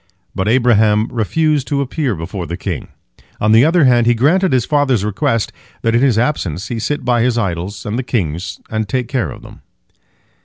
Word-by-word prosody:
But 95 - -2
Abraham 110 -2 +3
refused 145 +5 0
to 140 -2 -1
appear 135 -3 -2
before 85 +2 -6
the 85 - -4
king. 95 -5 -4 0.5
On 105 - +2
the 115 +2 +6
other 165 +2 +4
hand, 120 -3 +4
he 120 - +4
granted 170 +10 +2
his 125 -3 +2
father's 135 -8 +1
request 115 +2 -1 0.3
that 115 - +1
in 120 - +3
his 130 -5 +3
absence 110 - -1
he 120 -2 -3
sit 145 +5 -3
by 120 -1 +2
his 120 0 +1
idols 95 -1 -3
and 105 +4 -2
the - - +1
king's, 90 - -3
and 110 -1 -2
take 125 -2 -1
care 130 -2 -1
of - - -10
them. - - -14
115 Hz, 195 wpm, -17 LUFS, 105-130 Hz, 0.5 s, the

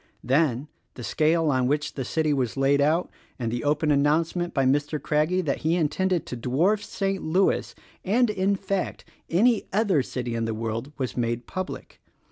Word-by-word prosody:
Then 135 0 +1 0.3
the 120 - -8
scale 160 +3 +2
on 130 -2 +1
which 150 +2 -1
the 135 - -3
city 155 +3 0
was 130 -3 -1
laid 140 +1 +3
out 160 +5 +2 0.3
and 115 -3 -2
the 120 - -3
open 150 +1 +1
announce 150 +4 +2
ment 175 -1 -2
by 135 -2 +1
Mr. 145 +3 +1
Craggie 155 +6 +1
that 145 -6 -1
he 160 +2 +1
intended 175 +2 0
to - - -5
dwarf 155 - +1
St. 195 -1 -2
Louis 180 +5 +1 0.3
and, 225 +4 +2
in 195 0 +1
fact, 195 -1 -3 0.2
any 220 +6 +3
other 195 -7 +2
city 125 -2 -4
in 115 -1 -1
the 115 -1 -2
world 115 +4 -4
was 130 -3 -3
made 120 0 -1
public. 185 0 -6
150 Hz, 180 wpm, -25 LUFS, 130-180 Hz, 0.3 s, laid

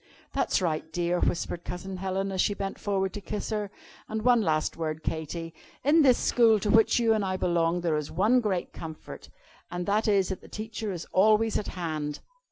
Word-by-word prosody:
"That's - - +1
right, 160 -1 -2
dear," 175 +1 0
whispered 175 0 -1
Cousin 190 +1 -6
Helen, 195 +1 -2
as 190 -1 +1
she 205 - +1
bent 195 -1 -4
forward 195 -2 -1
to 205 - -6
kiss 210 +3 -4
her. 210 -2 -2 0.4
"And 220 0 -3
one 245 -2 +5
last 155 -5 0
word, 160 -1 -4
Katy. 165 +1 -4 0.3
In 300 +5 +5
this 260 -4 +5
school, 225 -3 +4
to 205 - +1
which 225 0 +5
you 230 -2 +3
and 215 -2 0
I 185 -1 -1
belong, 175 -1 +1
there 165 -3 +1
is 150 -1 -4
one 215 +9 +3
great 195 -6 -2
comfort, 160 -1 -9 0.4
and 175 0 -4
that 210 +3 +1
is 200 -3 +3
that 190 - -4
the - - -14
Teacher 215 -1 -5
is 175 -3 -5
always 215 +3 +4
at 210 - -5
hand. 155 -4 -3
190 Hz, 200 wpm, -28 LUFS, 170-215 Hz, 0.4 s, one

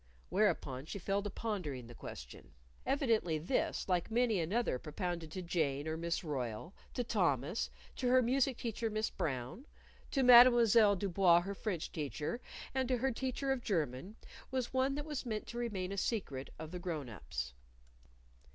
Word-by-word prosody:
Whereupon 130 +2 +1
she - - -5
fell 195 +2 0
to 205 - -4
pondering 180 - -4
the 120 - -11
question. - - -10 0.3
Evidently 225 - +2
this, 170 - -1
like 180 -2 +1
many 230 -3 +2
another 175 - 0
propounded 170 +1 -4
to 185 - -4
Jane 155 -4 0
or 160 - -1
Miss 170 +2 -2
Royle; 130 - -4 0.2
to 245 - 0
Thomas; 175 - 0 0.3
to 255 - 0
her 255 0 +5
music 260 +1 +2
teacher, 230 -1 -2
Miss 215 +1 -1
Brown; 130 - -4 0.4
to 270 - +1
Mademoiselle 235 -4 +8
Du 200 +2 -2
Bois, 175 -2 +5
her 195 +3 -4
French 185 -5 -3
teacher; 155 - -3 0.3
and 260 -1 0
to 255 0 +1
her 265 +3 +1
teacher 265 +2 -2
of 260 -2 -1
German, 165 - -2 0.3
was 260 -2 -2
one 260 +1 +2
that 295 0 -4
was 300 -4 -3
meant 220 -4 -3
to 240 - -6
remain 195 -6 -2
a 200 - -4
secret 180 - -2
of 160 0 -7
the 180 - -5
grown 165 -6 -3
ups. 65 - -5
195 Hz, 170 wpm, -35 LUFS, 155-240 Hz, 0.4 s, Mademoiselle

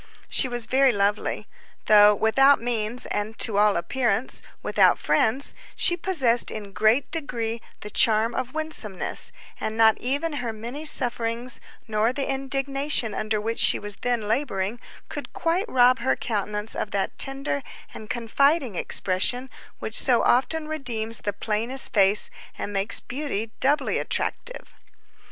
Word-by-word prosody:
She - - +2
was 240 -2 -2
very 265 +2 +3
lovely. 205 -1 -1 0.4
Though 210 -1 +6
without 270 +7 +4
means, 235 0 -1
and 210 +2 -4
to 205 -3 +1
all 210 -2 +3
appearance 230 +6 -1 0.2
without - - +3
friends, 260 +6 +1 0.2
she 345 - +2
possessed 275 -10 +2
in 205 -2 -6
great 220 +7 +2
degree 235 -7 -3 0.2
the 210 - -7
charm 225 +1 +3
of 255 -1 -3
winsomeness, 310 - -1 0.3
and 220 0 -4
not 220 -1 +4
even 285 +6 -2
her 235 -2 -3
many 240 +8 -7
sufferings, 240 -3 +1 0.3
nor 220 +1 +1
the 275 +1 -3
indignation 270 -2 -1
under 215 0 -1
which 225 +2 -3
she - - +5
was 205 -1 -6
then 240 -4 -2
laboring, 220 -3 -1 0.3
could - - -7
quite 360 +7 -1
rob 250 0 +4
her 250 +3 +1
countenance 210 -1 -3
of - - -3
that 200 -1 -2
tender 275 +1 0 0.3
and 215 - -10
confiding 265 +3 +1
expression 200 +9 0 0.3
which 220 - -6
so 245 -3 +3
often 305 +5 +1
redeems 235 -7 -3
the 205 - -3
plainest 230 +6 0
face 200 0 +4 0.3
and 205 - -5
makes 195 +2 +3
beauty 245 -5 -4
doubly 285 +3 +1
attractive. - - -4
235 Hz, 140 wpm, -24 LUFS, 215-270 Hz, 0.4 s, Though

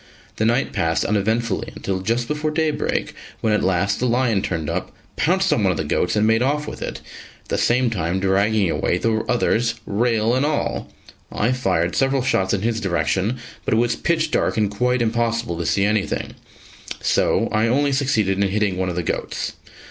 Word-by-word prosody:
The 110 - +1
night 120 +4 +1
passed 80 0 0
uneventfully 110 +1 0
until 95 -1 -3
just 115 +5 -1
before 150 +2 -1
daybreak, 155 -1 -1 0.3
when 110 - +2
at 105 - +1
last 95 +2 +1
the 125 - +1
lion 120 -4 +2
turned 80 -5 -3
up, - - -3 0.2
pounced 190 +3 +2
on - - +1
one 100 - +3
of 90 - 0
the - - -1
goats 90 +4 0
and 105 0 +3
made 110 +1 +3
off 150 +3 0
with - - -7
it, - - -5 0.4
at - - -28
the - - 0
same 120 0 +2
time 90 -2 -1
dragging 100 +2 +2
away 90 - 0
the 110 +3 +1
others, 115 -1 +1
rail 115 +1 +1
and 130 +2 +2
all. 150 0 -1 0.4
I 115 +4 +1
fired 90 -9 0
several 135 -1 +2
shots 95 -7 +1
in 100 -1 0
his 115 -1 0
direction, 95 +4 0 0.3
but - - +1
it - - +2
was 120 +1 +2
pitch 160 -2 0
dark - - +1
and 105 -2 +1
quite 125 +3 +1
impossible 115 -3 0
to 85 - -2
see 100 - +2
anything, 105 -1 -1 0.7
so - - +2
I 110 +1 +2
only 140 +4 +2
succeeded 110 -8 +1
in 100 - +2
hitting 100 -2 0
one 95 0 -1
of 90 - -4
the 90 - -1
goats. - - -3
110 Hz, 195 wpm, -21 LUFS, 95-125 Hz, 0.7 s, one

